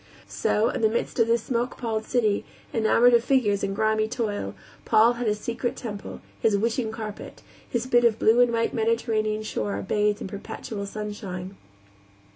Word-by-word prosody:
So, 220 +3 +1
in - - -3
the 220 - +4
midst 235 +2 -2
of 230 - +4
that 230 0 +4
smoke 240 +2 -2
palled 220 -2 -2
city, 220 -5 +1 0.3
enamored 230 +2 +4
of 235 -1 +5
figures 235 -7 +2
and 195 0 -1
grimy 215 +1 +1
toil, 210 - -3 0.3
Paul 225 +2 +5
had 240 -1 -3
his 210 0 +1
secret 235 +2 -3
temple, 205 -4 -7 0.2
his 215 -2 +3
wishing 225 +1 0
carpet, 215 -2 -8 0.3
his 240 0 -1
bit 240 -2 +3
of 230 -2 +4
blue 225 +2 +4
and 245 -1 +4
white 230 0 0
Mediterranean 220 -2 0
shore 105 - -3
bathed 210 0 +1
in - - -5
perpetual 200 +1 -6
sunshine. 195 -3 -6
220 Hz, 170 wpm, -25 LUFS, 210-235 Hz, 0.3 s, of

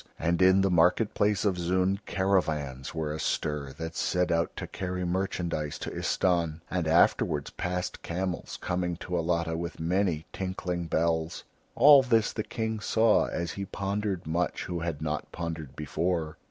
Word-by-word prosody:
And 85 +3 0
in 95 +1 +6
the 95 -1 +2
market 90 +6 +3
place 105 0 +1
of 95 -3 +1
Zoon 95 +3 +1
caravans 80 -9 0
were 80 -2 -2
astir 75 -2 -2
that 80 +3 -6
set 90 0 +1
out 85 0 0
to - - -4
carry 90 -1 -4
merchandise 85 -4 -2
to - - -5
Istahn, 85 -3 0
and 90 -3 0
afterwards 80 -3 +3
passed 90 0 -3
camels 90 +1 -3
coming 90 -1 -1
to 90 +1 -5
Alatta 85 -1 0
with 85 +1 -5
many 85 -1 0
tinkling 90 -2 -3
bells. 80 +1 0 0.3
All 140 +2 +8
this 115 -4 +2
the 110 - -2
King 110 0 -3
saw 110 +1 +3
as 85 -1 -3
he 100 - -4
pondered 100 -1 -2
much, 85 +2 -1
who 85 -1 -3
had 80 -3 -3
not 75 -1 -3
pondered 80 -4 -5
before. 80 +1 -2
85 Hz, 155 wpm, -28 LUFS, 80-95 Hz, 0.3 s, All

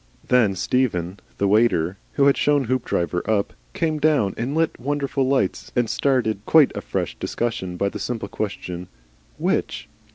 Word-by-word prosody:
Then 115 -6 +4
Stephen, 95 -6 0 0.2
the 100 - +1
waiter, 95 -5 +3 0.2
who 140 - +3
had 140 - +5
shown 145 -1 +2
Hoopdriver 115 -8 -1
up, 105 -2 +1 0.2
came 155 -2 0
down 145 -10 +2
and 130 +5 -3
lit 165 0 0
wonderful 140 -1 -1
lights 135 0 0
and 120 -2 +2
started 110 -6 0
quite 155 -4 +5
a - - -3
fresh - - -3
discussion 95 -7 -3
by 100 +2 +1
the - - -7
simple 115 -4 -3
question 90 -4 -5 0.5
"WHICH?" - - -1
120 Hz, 155 wpm, -23 LUFS, 100-140 Hz, 0.5 s, had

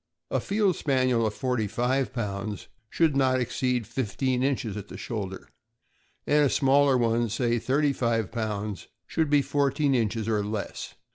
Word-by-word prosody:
A - - +1
Field 200 -3 +1
Spaniel 130 -5 +1
of 105 - -4
forty 125 -5 -1
five 125 +5 0
pounds 105 -3 -4 0.2
should 160 -4 +2
not 130 -1 +3
exceed 125 -1 -1
fifteen 130 +3 -1
inches 130 -6 -1
at 105 -1 -6
shoulder, 100 -5 -5 0.8
and 150 0 +4
a 140 - +4
smaller 140 0 +4
one, 115 -1 +1
say 120 +1 0
thirty 140 +4 +1
five 115 -5 0
pounds, 105 -3 -3 0.2
should 160 -2 0
be 145 -1 +4
fourteen 140 0 +1
inches 115 -2 0
or 105 -2 +1
less. 105 0 -5
125 Hz, 150 wpm, -27 LUFS, 110-135 Hz, 0.8 s, and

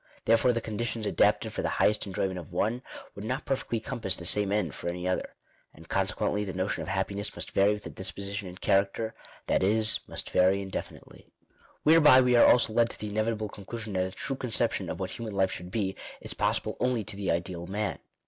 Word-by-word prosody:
Therefore 115 +2 +4
the 115 -1 -1
conditions 110 0 -3
adapted - - +2
fur - - -2
the - - -1
highest 105 0 +2
enjoyment 95 -1 -2
of 85 - -11
one, 110 +7 0 0.3
would 100 - -8
not 125 +6 -3
perfectly 130 -4 -1
compass 115 -5 -1
the 85 - -8
same 100 +2 +3
end 100 -9 0
for 85 - -4
any 90 +1 -4
other. 90 - -2 0.4
And - - -14
con - - +1
sequently 105 - 0
the 95 -2 -5
notion 95 +2 -1
of - - -6
happiness 100 +1 -1
must - - -5
vary 100 +2 +4
with 105 0 -6
the - - -7
die* - - -10
■position 100 +1 -3
and 90 +1 -10
character; 100 +3 +1 0.3
that - - +1
is, 110 +3 +3
must - - -4
vary 95 +2 +4
indefinitely. 95 -1 -7 0.6
Whereby 150 -4 +7
we 125 -1 +4
are 120 - +7
also 120 -3 +3
led 115 0 +3
to - - -7
the 105 - -4
inevitable 110 0 -1
conclusion 105 +2 -7
that 95 -1 +1
a - - -8
true 135 - -3
conception 125 -4 0
of - - -4
what 95 -1 -3
human 110 -2 -6
life 95 -1 +2
should 90 0 -7
be, 100 -2 -1 0.2
is - - -4
possible - - -1
only 125 -3 +1
to 105 0 -8
the 100 -1 -3
ideal 85 0 -2
man. 105 +1 -2
105 Hz, 215 wpm, -28 LUFS, 95-115 Hz, 0.6 s, Whereby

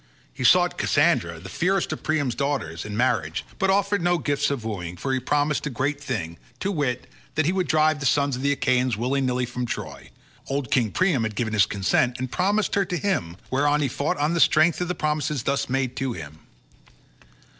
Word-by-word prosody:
He - - -5
sought - - +4
Cassandra, 85 -1 +2
the 90 - -10
fairest 185 - 0
of - - -7
Priam's 145 -6 0
daughters, 130 - -2
in 105 -1 -5
marriage, 85 -10 0
but 195 - +2
offered 200 0 +2
no 175 +1 +2
gifts 145 -3 0
of 135 -6 -3
wooing, 90 -5 -5
for 135 +8 -2
he 130 - +1
promised 145 +3 0
a - - -2
great 140 +2 -2
thing, 95 - -4 0.2
to 195 - -1
wit, 140 -8 -1 0.3
that 155 - +2
he 170 - +2
would 185 -2 0
drive 155 -1 +3
the 135 - 0
sons 140 0 +2
of 125 - -6
the 140 +1 +2
Achaeans 130 -4 +1
willy 130 +4 0
nilly 125 -1 0
from 125 0 -4
Troy; - - -6 0.4
old 135 -3 -3
King 120 -5 +3
Priam 175 - +1
had 110 -1 -2
given 110 0 -2
his 105 -5 +4
consent 105 +5 +1
and 130 0 -4
promised 205 +3 +1
her 200 -1 +2
to 180 - -2
him, 95 - -1
whereon 145 +3 +2
he 140 - +2
fought 140 +4 -2
on 150 +3 +1
the 170 - 0
strength 160 +1 +4
of 180 - -1
the 180 - -2
promises 150 -3 -1
thus 140 -1 -1
made 130 -1 -1
to 130 -2 -1
him. 80 -3 -9
135 Hz, 210 wpm, -24 LUFS, 120-155 Hz, 0.4 s, sought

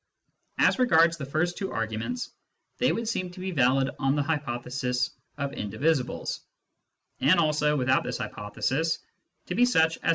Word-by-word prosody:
As - - +3
regards 170 -9 +5
the 140 -4 -6
first 175 +5 -1
two 195 - -3
arguments, 115 - -3 0.5
they 250 - +3
would 230 0 -2
seem 185 -5 -1
to 180 - -12
be 190 +1 -3
valid 135 -3 +3
on 135 0 +2
the 145 - +1
hypothesis 125 -4 -2 0.3
of 140 -1 -3
indi 105 +1 -5
visibles, 140 -2 0 0.8
and 170 +6 +4
also, 150 -2 +2
without 130 0 +2
this - - -3
hypothesis, 135 +10 -2 0.5
to - - -4
be 245 - +3
such 160 -8 +3
as - - -31
* - - -12
Cf. - - +2
150 Hz, 170 wpm, -27 LUFS, 130-170 Hz, 0.8 s, regards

